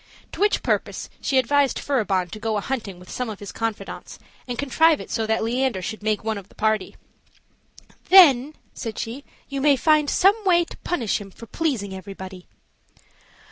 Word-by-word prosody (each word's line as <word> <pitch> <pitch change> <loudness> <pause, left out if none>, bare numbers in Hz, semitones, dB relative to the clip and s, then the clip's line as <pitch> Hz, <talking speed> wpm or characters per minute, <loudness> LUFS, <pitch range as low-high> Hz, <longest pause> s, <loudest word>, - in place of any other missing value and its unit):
To - - -9
which 415 +1 +2
purpose - - -2
she 270 - +1
advised 275 +2 +2
Furibon 195 -10 0
to 215 - -7
go 220 0 -1
a - - +1
hunting 215 -6 -4
with 180 +1 -13
some 250 -2 -3
of 215 - -6
his 205 - -8
confidants, 225 -2 -5 0.3
and 245 -1 -4
contrive 315 +3 +3
it - - -9
so 225 -2 -1
that 220 0 +1
Leander 245 -2 0
should 220 +4 -5
make 215 0 -1
one 220 -2 -2
of 200 0 -15
the - - -21
party. 215 -3 0 1.1
"Then," 300 -6 +7 0.2
said 225 -2 -6
she, 245 +5 -5 0.2
"you 275 -1 -4
may 290 0 +5
find 305 +1 +3
some 405 +4 +3
way 345 -3 +4
to - - -12
punish 235 - -1
him 200 - -9
for 230 - -12
pleasing 235 -9 -2
everybody." 190 -1 -9
230 Hz, 180 wpm, -23 LUFS, 210-285 Hz, 1.1 s, Then